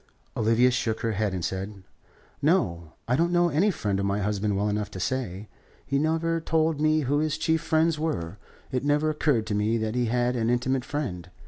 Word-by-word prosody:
Olivia 115 +3 +3
shook 115 -2 -1
her 115 -1 0
head, 105 0 0
and 90 -2 -3
said: 95 +1 -5 0.6
"No. 85 - +1
I 125 - +2
don't 170 +5 +2
know 175 0 +3
any 170 +7 +2
friend 105 - -1
of 100 - 0
my 100 +1 0
husband 105 0 -1
well 100 +1 +1
enough 105 -1 -1
to 95 - -8
say. 105 -3 -3 0.4
He 140 0 0
never 165 +2 0
told 160 -1 +1
me 155 0 +3
who 145 +1 +1
his 155 -1 0
chief 160 -1 +1
friends 160 -1 +2
were. 100 - -3 0.3
It 130 -1 -1
never 150 +2 +2
occurred 145 -7 +1
to 110 - -3
me 105 +3 +1
that 110 -1 -2
he 125 0 +1
had 120 +1 +1
an 115 -1 0
intimate 125 +1 0
friend. 90 - -4
125 Hz, 205 wpm, -26 LUFS, 105-155 Hz, 0.6 s, Olivia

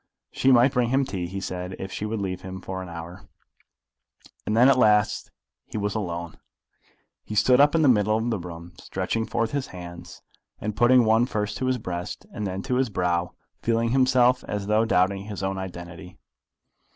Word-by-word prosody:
She 135 - +2
might 125 +1 +6
bring 125 -2 +1
him 135 +2 +2
tea, 95 -9 -4
he 95 +3 -5
said, 90 0 -5
if 95 - -6
she 105 - -4
would 110 0 -3
leave 95 -2 -3
him 95 0 -7
for 95 0 -6
an 90 - -8
hour. 85 +1 -9 1.2
And 105 - +1
then 125 +2 +7
at 135 - +6
last 105 -3 +3 0.4
he - - -6
was 105 -1 -1
alone. 85 -5 -4 0.8
He 105 - -7
stood 125 +5 +5
up 145 +2 +4
in 160 - +3
the - - +5
middle 110 -3 +3
of 115 +1 -2
the 110 - -1
room, 85 0 -9
stretching 105 +4 -3
forth 115 -1 -1
his 140 -2 -2
hands, 85 -1 -10 0.4
and 105 0 -4
putting 120 +2 +5
one 110 +2 +3
first 105 -2 -2
to 130 - -2
his 130 0 +1
breast 90 -5 -5
and 105 -2 -3
then 95 +1 -4
to 125 -2 -1
his 130 -2 +1
brow, 90 -2 -1 0.3
feeling 115 0 +1
himself 130 -1 +3
as 105 -1 -3
though 105 +2 +2
doubting 95 -1 +1
his 105 -2 -6
own 95 0 -2
identity. 90 -1 -8
105 Hz, 195 wpm, -25 LUFS, 90-120 Hz, 1.2 s, then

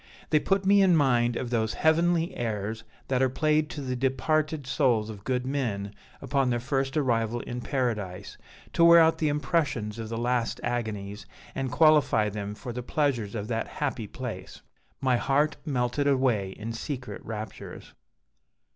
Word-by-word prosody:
They 155 - +5
put 195 +4 0
me 200 +1 +5
in 185 -3 +5
mind 120 -5 +3
of 120 0 -4
those 110 -2 0
heavenly 165 +1 +2
airs 110 -1 -3 0.2
that 130 -1 +1
are 130 - +3
played 155 +2 +1
to 150 - -6
the 130 -2 -3
departed 145 +3 0
souls 120 -5 +1
of 100 -2 -11
good 125 -1 -1
men 115 -8 -2 0.3
upon 135 -2 +1
their 120 -1 0
first 135 +3 -1
arrival 120 -4 0
in 125 +1 -6
paradise, 110 -10 -3 0.4
to 170 - +3
wear 170 0 +9
out 160 0 +4
the 155 - +1
impressions 145 -7 -1
of 110 -1 -5
the 115 - -3
last 120 0 0
agonies, 105 -5 -3 0.3
and 135 -2 -3
qualify 150 -9 +4
them 105 0 -5
for 120 +2 -7
the 125 - -4
pleasures 120 -6 -1
of 105 -1 -4
that 115 -1 -1
happy 135 -7 -3
place. 110 -6 -7 0.4
My 130 -2 +3
heart 145 +4 +1
melted 130 +1 0
away 125 -9 +1
in 115 +2 -5
secret 125 +1 -6
raptures. 110 -2 -8
125 Hz, 165 wpm, -27 LUFS, 110-145 Hz, 0.4 s, wear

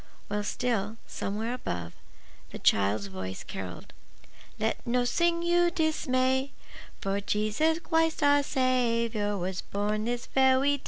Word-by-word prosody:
While 205 0 -1
still, 220 -1 -1
somewhere 220 +4 -3
above, 85 - -4 0.6
the - - -7
child's 100 +1 +2
voice 95 -1 -6
carolled, 90 -2 -7 0.6
—Let 220 +1 0
nossing 295 +8 +1
you 345 0 +4
dismay; 265 -5 +1 0.5
For 195 +1 -1
Jesus 215 +11 +1
Christ 325 -2 +1
our 285 0 +5
Sa 275 -1 -2 0.5
wiour 205 -3 -2
Was 180 +1 -3
born 210 +1 -2
this 240 0 -2
ve 265 -1 +4
wy 280 +2 +3
day. - - -18
235 Hz, 130 wpm, -28 LUFS, 200-285 Hz, 0.6 s, our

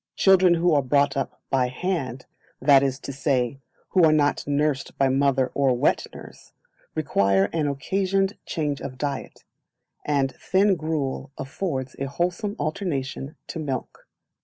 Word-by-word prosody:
Children 185 -2 +5
who 170 0 +2
are 145 - +4
brought 140 +1 +2
up 135 - -4
by 130 -2 +2
hand, 130 -3 -3 0.3
that 140 -2 +6
is 135 -1 0
to 140 - -6
say, 135 -2 0 0.3
who 185 - +3
are 160 - +6
not 145 -2 +1
nursed 145 -1 -1
by 135 -1 +3
mother 135 -1 +2
or 135 -3 +2
wet - - +1
nurse, - - -13 0.4
require 100 0 +2
an 155 -3 0
occasioned 190 +8 0
change 150 -4 -2
of 130 -1 -6
diet, 140 +1 -4 0.6
and 140 -2 +1
thin 195 +1 +2
gruel 155 -6 -3
affords 135 -3 -4
a 135 - -1
wholesome 180 - -2
alternation 145 -3 -3
to 165 - -6
milk. 135 -5 -5
140 Hz, 145 wpm, -24 LUFS, 135-165 Hz, 0.6 s, that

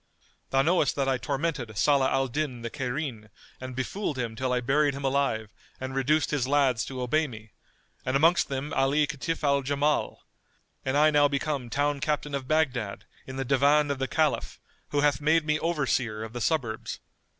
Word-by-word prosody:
Thou 135 0 +3
knowest 160 -3 +2
that 140 -1 0
I 130 -1 +1
tormented 140 -7 -3
Salah 140 +2 +3
al 135 0 +1
Din 130 -2 -3
the 115 - -4
Cairene 125 -5 -4 0.3
and 130 -1 -7
befooled 140 +4 -3
him 115 -3 -3
till 130 +2 -2
I 125 - +2
buried 140 +3 +2
him 140 - -6
alive 130 -6 0 0.3
and 130 0 -5
reduced 145 +3 +1
his 140 -4 0
lads 135 -5 +2
to 130 -2 -5
obey 155 +5 +1
me, 110 -4 -11 0.5
and 130 - -1
amongst 165 +5 +4
them 135 +2 -3
Ali 135 +3 +3
Kitf 165 +2 -4
al 140 -1 +3
Jamal; 145 +2 0 0.6
and 135 +2 0
I 155 +1 +6
am - - -3
now 145 0 +5
become 140 -3 -2
town 145 +3 0
captain 150 0 -2
of 135 -2 -3
Baghdad 130 -10 0 0.2
in 130 - -7
the 135 0 -2
Divan 145 +3 +3
of 140 - -3
the 135 - -1
Caliph 155 0 0 0.3
who 145 - +1
hath 145 0 +2
made 160 +1 +3
me 150 0 +1
over 165 -4 0
seer 110 -4 -1
of 110 0 -8
the 120 - -5
suburbs. 120 -7 -1
140 Hz, 195 wpm, -27 LUFS, 130-150 Hz, 0.6 s, I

